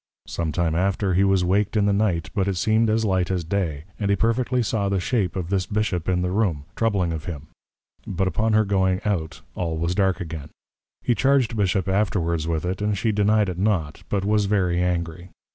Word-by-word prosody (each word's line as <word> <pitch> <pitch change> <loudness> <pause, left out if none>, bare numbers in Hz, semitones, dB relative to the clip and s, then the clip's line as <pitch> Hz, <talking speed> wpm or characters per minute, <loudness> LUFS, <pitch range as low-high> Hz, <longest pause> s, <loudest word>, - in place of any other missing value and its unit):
Some 80 -2 -3
time 80 +1 0
after, 95 +2 +1
he 95 +3 +3
was 95 -2 +3
waked 105 +4 +1
in 105 - +3
the 100 - +3
Night; 100 -6 0
but 100 -3 0
it 100 - 0
seem'd 110 +5 +2
as 110 +1 +1
light 95 -3 +1
as 90 -2 -1
day; 80 -5 -2 0.2
and 100 -2 -1
he 100 - +4
perfectly 120 +3 +1
saw 100 -2 0
the 100 -1 +1
shape 95 -2 0
of 90 -1 -4
this 95 -2 0
Bishop 100 -5 -1
in 90 -1 +1
the 90 - -1
Room, 90 -8 0
troubling 100 -7 +1
of 80 -2 -5
him; 75 -3 -7 0.6
but 95 +1 0
upon 110 +5 0
her 110 0 +4
going 95 -2 +1
out, 80 -7 -2
all 80 -2 -2
was 85 +2 0
dark 95 -2 +1
again. 80 -4 -6 0.5
He 120 - +2
charg'd 130 -2 +2
Bishop 95 -3 +1
afterwards 90 -5 0
with 80 0 -1
it, 90 +2 -2
and 105 -1 0
she 110 +3 +1
deny'd 105 0 +2
it 90 -1 -4
not; 95 -7 0
but 100 -1 -1
was 105 0 +2
very 90 -4 +1
angry. 85 -1 -2
95 Hz, 210 wpm, -23 LUFS, 85-105 Hz, 0.6 s, he